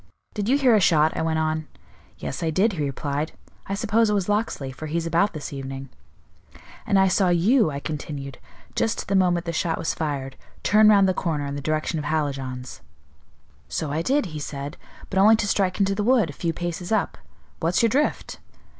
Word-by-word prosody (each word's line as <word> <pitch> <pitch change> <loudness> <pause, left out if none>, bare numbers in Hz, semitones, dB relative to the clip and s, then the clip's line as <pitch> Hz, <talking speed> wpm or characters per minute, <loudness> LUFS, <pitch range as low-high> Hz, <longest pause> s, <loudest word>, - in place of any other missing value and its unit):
'Did 210 0 -2
you 275 - +4
hear 260 -4 +4
a 215 - +5
shot?' 160 -4 +3
I - - -1
went 160 0 0
on. 155 0 -1 0.5
'Yes, 155 - -5
I 165 - 0
did,' 195 +7 +2
he 175 - -6
replied; 145 +2 -3 0.3
'I 195 - -2
suppose 225 +1 +2
it 210 - +2
was 195 -3 0
Locksley, 205 -10 -1
for 155 +4 -7
he's 165 +2 -2
about 170 +5 +2
this 150 -2 -6
evening,' 135 0 -6 1.0
'And 200 - +3
I 190 0 +5
saw 185 0 +2
you,' 185 - +4
I 140 -1 -4
continued, 145 -3 -6 0.4
'just 225 - 0
at - - -23
the 195 - +2
moment 175 -2 +2
the 170 - -3
shot 165 0 0
was 165 - -1
fired, 140 -4 -4 0.3
turn 215 +1 +6
round 200 -2 +6
the 185 - +2
corner 155 -5 -2
in 140 - -4
the 145 - -4
direction 155 +2 -1
of 150 - -5
Hallijohn's.' 135 -5 -3 0.9
'So 155 -3 -3
I 155 +2 0
did,' 275 +7 +1
he 155 - -4
said, 145 +1 -5 0.4
'but 190 - +1
only 215 +3 +7
to 220 - -1
strike 195 -2 +1
into 195 0 +2
the 205 +1 -1
wood, 230 - +3
a - - -14
few 165 +3 -2
paces 175 +2 -5
up. 215 -2 0 0.4
What's 170 +6 +1
your 230 - +5
drift? 290 +6 -1
170 Hz, 210 wpm, -24 LUFS, 150-200 Hz, 1.0 s, only